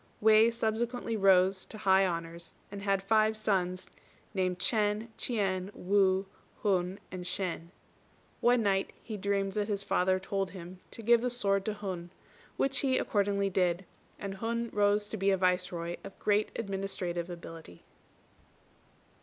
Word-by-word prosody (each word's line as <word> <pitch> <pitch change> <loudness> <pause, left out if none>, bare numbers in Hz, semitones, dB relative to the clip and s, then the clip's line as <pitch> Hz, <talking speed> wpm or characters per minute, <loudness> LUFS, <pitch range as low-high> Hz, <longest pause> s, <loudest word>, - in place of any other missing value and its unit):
_" - - -33 0.2
Wei 220 +1 +6
subsequently 230 +1 -1
rose 190 -1 +4
to 215 - -9
high 195 -2 +4
honours, 170 -1 -5 0.2
and 200 -1 -6
had 195 -1 +1
five 215 +1 +3
sons 185 -4 0 0.5
named 185 -2 0
Ch'ên, 210 +2 +1
Ch'ien, 195 -5 -1
Wu, 190 0 +2 0.4
Hun, 190 -2 +1
and 180 -1 -5
Shên. 180 -2 -3 0.7
One 240 -1 +4
night 195 -1 +1
he 220 - -5
dreamt 200 -1 -1
that 205 0 -1
his 200 -2 -2
father 185 -1 +2
told 195 0 -2
him 180 -1 -10
to 230 - -8
give 235 +1 +5
the 250 - 0
sword 200 -5 +1
to 215 - -2
Hun, 185 -4 -5 0.5
which 270 0 +2
he 260 -2 +2
accordingly 200 -1 +1
did; 180 0 +1 0.3
and 195 -1 -5
Hun 230 +2 -2
rose 205 0 +2
to 220 - -4
be 195 0 +2
a 195 - +3
Viceroy 180 -2 0
of - - -10
great 210 0 +1
administrative 190 -4 -3
ability. 165 - -10
195 Hz, 150 wpm, -31 LUFS, 185-215 Hz, 0.7 s, Wei